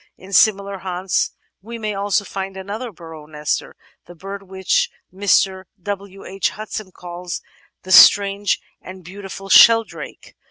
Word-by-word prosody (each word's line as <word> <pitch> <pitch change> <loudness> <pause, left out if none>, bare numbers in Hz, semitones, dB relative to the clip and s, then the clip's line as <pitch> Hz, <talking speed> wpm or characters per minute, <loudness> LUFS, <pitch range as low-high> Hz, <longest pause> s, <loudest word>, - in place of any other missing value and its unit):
In 190 +2 -13
similar 200 -2 +3
haunts 185 0 -1 0.3
we 230 +4 -8
may 215 -2 -3
also 200 0 0
find 195 0 -6
another 210 +5 -6
burrow 160 -4 -12
nester 150 -1 -3
— - - -38
the 175 - -12
bird 195 +3 -8
which 190 -1 0 0.2
Mr. 190 -1 +1
W. 195 0 -7
H. 195 +1 -1
Hudson 215 -2 -7
calls 175 0 -7 0.4
"the 185 - -7
strange 200 +2 +6 0.2
and 185 0 -11
beautiful 195 +2 -9
Sheldrake." 225 +3 +4
195 Hz, 135 wpm, -20 LUFS, 185-200 Hz, 0.4 s, strange